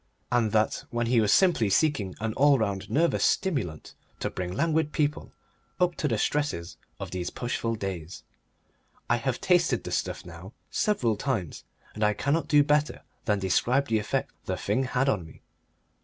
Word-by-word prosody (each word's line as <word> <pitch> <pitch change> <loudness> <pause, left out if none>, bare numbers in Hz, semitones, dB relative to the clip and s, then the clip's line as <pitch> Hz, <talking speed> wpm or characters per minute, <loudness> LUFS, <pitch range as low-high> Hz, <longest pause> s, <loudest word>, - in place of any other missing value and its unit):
And 120 -3 +2
that 110 0 +1
when 120 0 -1
he 115 0 +3
was 105 -1 +2
simply 170 - +4
seeking 110 - +1
an 110 0 -2
all 140 +2 +5
round 100 -3 -2
nervous 160 +9 +2
stimulant 125 - -1 0.3
to - - -2
bring 90 -1 -4
languid 160 - +1
people 150 -1 -1 0.5
up 180 -1 +3
to 150 - 0
the 115 -5 0
stresses 125 -12 -1 0.2
of - - -6
these 90 -1 -3
pushful 115 -2 -2
days. 95 -5 -6 0.9
I - - +4
have - - -2
tasted - - +2
the - - -6
stuff - - -2
now 85 +4 -10 0.2
several 125 - +1
times, 110 - -3 0.3
and 110 - -3
I 105 0 +3
cannot 140 +11 0
do 145 -1 +5
better 150 +1 +1 0.2
than 105 -2 +2
describe 120 +8 +1
the 110 -1 +2
effect 105 - -2
the - - -2
thing 130 - 0
had 130 +1 0
on 105 -10 +1
me. 80 - -15
115 Hz, 170 wpm, -27 LUFS, 100-145 Hz, 0.9 s, all